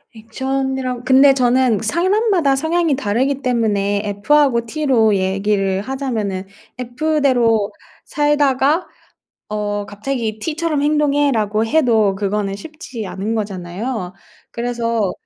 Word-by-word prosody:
액션이라 265 +2 -3
근데 270 +2 +6
저는 250 -3 +2
사람마다 350 - +2
성향이 320 +1 +1
다르기 265 +3 -1
때문에 205 -5 0 0.2
F하고 280 -5 +3
T로 235 -6 +2
얘기를 195 0 0
하자면은 215 -6 -3 0.3
F대로 250 -4 +1 0.3
살다가 295 +2 +1 0.6
어 205 -1 -2
갑자기 220 +1 -4
"T처럼 320 +2 -2
행동해."라고 285 -8 +1
해도 225 -7 +2
그거는 200 0 -2
쉽지 255 - -8
않은 210 +5 -3
거잖아요. 195 +1 -4 0.4
그래서 235 -4 -1
245 Hz, 265 characters per minute, -18 LUFS, 210-280 Hz, 0.6 s, 근데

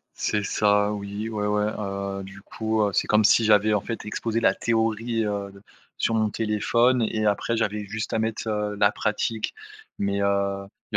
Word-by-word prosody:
C'est 105 -1 -1
ça, 105 +1 +2
oui, 100 +1 -5
ouais, 105 -2 -2
ouais. 105 0 +1
Heu, 100 -1 -4
du 95 0 -11
coup, 110 +1 -1
heu, 100 -1 +1
c'est - - +1
comme 105 0 +3
si 115 - +5
j'avais, 105 0 +4
en 105 - +2
fait, 115 +3 -5
exposé 115 +2 -2
la 95 -4 +4
théorie, 115 0 0
heu, 100 -1 -3
de 100 0 -16 0.4
sur 115 - +1
mon 110 -1 +2
téléphone 115 +4 +2
et 110 -1 -1
après 105 +3 +1
j'avais 105 -1 -1
juste 110 +2 -5
à 110 - +1
mettre, 110 0 -2
heu, 105 -1 -1
la 100 0 +4
pratique. 110 +1 -1 0.5
Mais 100 0 0
heu, 100 0 0 0.3
il - - +2
105 Hz, 190 wpm, -25 LUFS, 100-110 Hz, 0.5 s, si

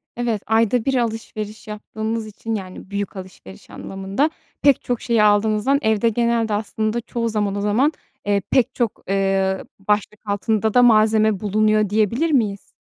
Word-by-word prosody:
Evet, 235 -4 -1
ayda 225 +1 +2
1 270 -1 +1
alışveriş 220 -2 -4
yaptığınız 220 +1 -4
için 225 +1 -5
-yani, 190 -1 -8
büyük 200 0 -4
alışveriş 185 - -11
anlamında 195 +10 -2 0.3
pek 280 -3 +4
çok 245 -2 -2
şeyi 230 -3 +2
aldığınızdan 215 +6 +3
evde 220 0 +2
genelde 230 -1 0
aslında 215 +2 -2
çoğu 230 0 -3
zaman, 205 -2 -1
o 200 - -2
zaman, 225 +9 +2 0.3
eee, 200 -1 +1
pek 255 0 +2
çok, 235 -4 -2
ııı, 195 -1 0 0.2
başlık 210 0 0
altında 215 +1 0
da 245 - +6
malzeme 215 -2 +4
bulunuyor 215 0 +2
diyebilir 225 - +1
miyiz? 210 -7 0
215 Hz, 150 wpm, -21 LUFS, 205-230 Hz, 0.3 s, da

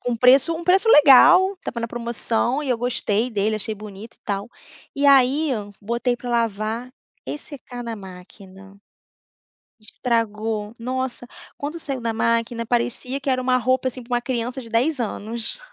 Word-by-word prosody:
Com 245 -1 -2
preço 255 +7 +5
um 340 - -7
preço 380 +5 +3
legal, 360 - +7
estava 360 -10 -7
na 230 - -2
promoção 235 +3 -2
e 285 - -5
eu 250 - +2
gostei 235 -1 -1
dele, 215 0 0
achei 215 +1 -4
bonito 210 +1 -11
e - - -42
tal. 200 +1 -3 0.5
E 285 +1 +2
aí, 275 +3 +4 0.3
botei 235 +3 -1
pra 245 - -8
lavar 230 +1 -1 0.3
e - - -4
secar 255 -4 -10
na 230 -1 -4
máquina. 190 0 -13 1.1
Estragou! 215 -2 -2
Nossa! 255 +1 -4 0.3
Quando 295 +4 -5
saiu 275 -4 -4
da 230 -1 -1
máquina 230 +1 0
parecia 245 +2 -1
que 275 - -5
era 255 -1 +1
uma 255 0 +2
roupa, 255 +1 +1
assim, 255 0 -8
pra 245 +1 -4
uma 240 - +1
criança 245 0 -3
de 235 - -11
10 250 +6 +1
anos. 230 - -4
240 Hz, 165 wpm, -22 LUFS, 220-260 Hz, 1.1 s, legal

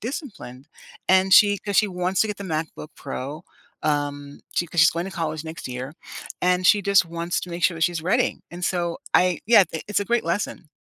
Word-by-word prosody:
disciplined, 180 - -7 0.4
and 190 +1 +4
she 205 - +8 0.2
‘cause 205 -1 -2
she 210 - -2
wants 180 0 -1
to - - -1
get 210 - -4
the 200 - -6
MacBook 155 -1 -5
Pro, 145 +4 -6 0.4
um, 145 -1 -2
she 175 - 0
‘cause 170 0 0
she's 165 - +7
going 170 - -1
to - - -6
college 155 -1 -3
next 160 0 -7
year, 125 +4 -6 0.6
and 180 0 +1
she 210 - +6
just 200 -2 +4
wants 170 +1 -3
to 180 - -8
make 170 0 -6
sure 175 - +3
that 165 - +1
she's 170 -2 -5
ready, 245 +1 +3 0.2
and 175 +1 -9
so 180 - -1 0.4
I 180 -3 0
yeah, 220 -3 +7 0.3
it's 210 - +1
a 205 - -2
great 240 -5 +2
lesson. 180 -4 -4
175 Hz, 210 wpm, -23 LUFS, 155-195 Hz, 0.6 s, she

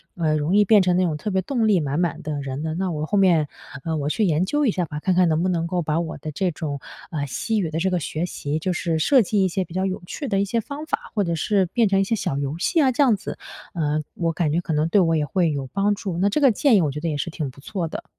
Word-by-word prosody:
呃 160 -3 +1
容 155 +5 0
易 210 0 +5
变 210 0 +6
成 180 -1 +2
那 185 - +3
种 160 -4 0
特 210 - -4
别 190 0 +1
动 230 +3 0
力 200 -4 +4
满 145 0 -1
满 175 -3 -1
的 150 -1 -4
人 135 0 -4
的。 160 0 -2
那 185 +1 -1
我 155 -1 -2
后 205 - 0
面， 175 -6 +4 0.4
呃 165 -1 -2
我 145 -1 -1
去 220 - 0
研 165 0 +2
究 295 +8 +1
一 235 - +3
下 180 -3 -1
吧， 150 -1 -6
看 185 +3 +1
看 180 0 +4
能 160 0 +1
不 185 - +1
能 170 -2 0
够 180 +1 -1
把 155 0 0
我 165 -2 -4
的 155 +2 -6
这 180 +4 -1
种， 150 -3 -4 0.3
呃， 150 -4 -2
西 220 - -1
语 175 -5 -1
的 160 +1 -2
这 190 +3 +1
个 180 -1 0
学 160 +1 -3
习， 150 -3 -3
就 185 +3 -1
是 165 -2 -1
设 260 - +5
计 205 -1 +1
一 - - +3
些 185 +1 -1
比 175 - -12
较 185 +1 0
有 190 +2 -3
趣 285 - -5
的 195 -5 +1
一 - - +1
些 230 +4 0
方 290 +6 -7
法， 440 +8 -4
或 205 - +2
者 170 -2 -1
是 195 +4 +1
变 225 +5 +2
成 195 0 +3
一 - - +3
些 210 +4 0
小 140 -9 -2
游 140 +2 -2
戏 330 - +2
啊， 265 -3 +4
这 255 - 0
样 245 -6 +4
子， 195 - -7 0.4
呃， 155 -2 0
我 170 -2 0
感 160 -2 0
觉 165 +3 +1
可 170 -2 -3
能 150 +1 +1
对 200 +3 +4
我 165 -2 +2
也 150 -2 +1
会 165 +3 +1
有 140 -2 -3
帮 200 +1 +2
助， 195 -5 -4
那 195 +3 +2
这 295 - 0
个 270 -3 +6
建 240 +3 +3
议 195 - +5
我 150 -4 0
觉 150 - -5
得 165 +2 -2
也 150 - -2
是 145 - -2
挺 155 -4 -4
不 130 - -15
错 185 +1 -3
的。 - - -7
175 Hz, 340 characters per minute, -23 LUFS, 155-200 Hz, 0.4 s, 变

